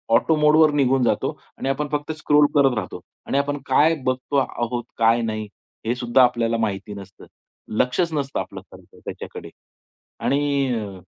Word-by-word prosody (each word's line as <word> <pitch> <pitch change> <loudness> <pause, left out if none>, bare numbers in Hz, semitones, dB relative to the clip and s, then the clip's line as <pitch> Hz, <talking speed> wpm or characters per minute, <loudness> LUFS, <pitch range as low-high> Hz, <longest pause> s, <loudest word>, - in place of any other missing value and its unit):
auto 160 +6 +3
मोड 150 0 +5
निघून 135 -2 +2
जातो - - +1 0.3
आणि 135 - -3
आपण 145 +2 -1
फक्त 150 +1 -2
स्क्रोल 150 -1 +4
करत 135 -3 +4
राहतो - - -5 0.3
आणि 140 - 0
आपण 145 +1 0
काय 150 +5 +4
बघतो 130 +2 -2
आहोत, 120 -2 -1
काय 115 +1 +3
नाही, 110 -1 -3 0.4
हे 120 +2 0
सुद्धा 125 +1 +3
आपल्याला 115 -2 +1
माहिती 105 -2 -3
नसतं, 95 -2 -12 0.5
लक्षच 160 +7 +1
नसतं 140 -2 -2
आपलं - - -6
खरंतर - - -17
त्याच्याकडे - - -8 0.7
आणि 130 -9 -1
130 Hz, 150 wpm, -22 LUFS, 115-145 Hz, 0.7 s, मोड